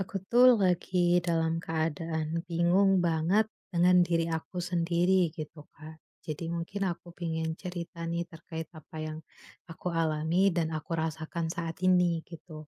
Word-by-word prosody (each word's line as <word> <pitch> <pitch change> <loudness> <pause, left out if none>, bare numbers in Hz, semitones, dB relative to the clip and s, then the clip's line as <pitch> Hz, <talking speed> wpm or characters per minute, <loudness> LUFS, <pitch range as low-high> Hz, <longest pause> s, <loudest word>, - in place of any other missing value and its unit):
Aku 195 +1 -4
tuh, 250 +1 +7
lagi 180 -2 +2
dalam 165 -1 +1
keadaan 160 0 -2
bingung 180 +3 +3
banget 170 +6 +2 0.3
dengan 180 +1 +5
diri 165 -1 +1
aku 160 +3 -4
sendiri 175 +1 +2
gitu, 155 -1 -8
Kak. 155 +2 -11 0.2
Jadi 155 +1 -5
mungkin 170 +4 -3
aku 175 0 -6
pengen 160 -1 -2
cerita 170 -2 -6
nih, 170 +1 -1
terkait 160 -1 -8
apa 155 +1 -12
yang 155 0 -5 0.5
aku 180 +3 -5
alami 165 +4 +2
dan 165 -2 0
aku 155 +1 -5
rasakan 160 +1 -3
saat 165 0 -4
ini, 180 -2 +3
gitu. 155 -2 -11
170 Hz, 140 wpm, -29 LUFS, 160-180 Hz, 0.5 s, tuh